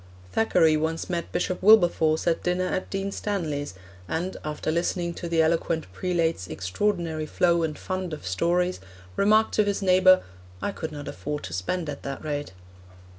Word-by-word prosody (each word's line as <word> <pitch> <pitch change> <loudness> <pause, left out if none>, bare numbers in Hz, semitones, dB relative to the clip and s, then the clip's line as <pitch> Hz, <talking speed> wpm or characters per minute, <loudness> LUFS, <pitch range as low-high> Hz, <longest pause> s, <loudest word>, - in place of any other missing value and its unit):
Thackeray 170 -8 +3
once 160 +3 -2
met 170 -1 -3
Bishop 180 +1 -1
Wilberforce 175 -6 +5
at 170 -1 +1
dinner 180 +1 0
at 185 0 -2
Dean 195 0 -2
Stanley's, 155 - -3 0.3
and, 175 - -2
after 150 +1 -2
listening 170 +1 -1
to 170 0 -6
the 165 -1 +3
eloquent 160 0 0
prelate's 165 - -1
extraordinary 160 - -2
flow 170 +1 +2
and 155 -2 -2
fund 185 -2 -4
of 155 -9 -7
stories, 175 - +1 0.4
remarked 215 +2 +3
to 215 - +4
his 205 0 -1
neighbour, 185 0 +6 0.4
'I 205 - -2
could 160 -5 -5
not 145 -1 -7
afford 150 0 -4
to - - -6
spend 160 - -2
at 145 -1 -5
that 140 0 -6
rate.' 145 -6 -3
170 Hz, 165 wpm, -26 LUFS, 155-185 Hz, 0.4 s, neighbour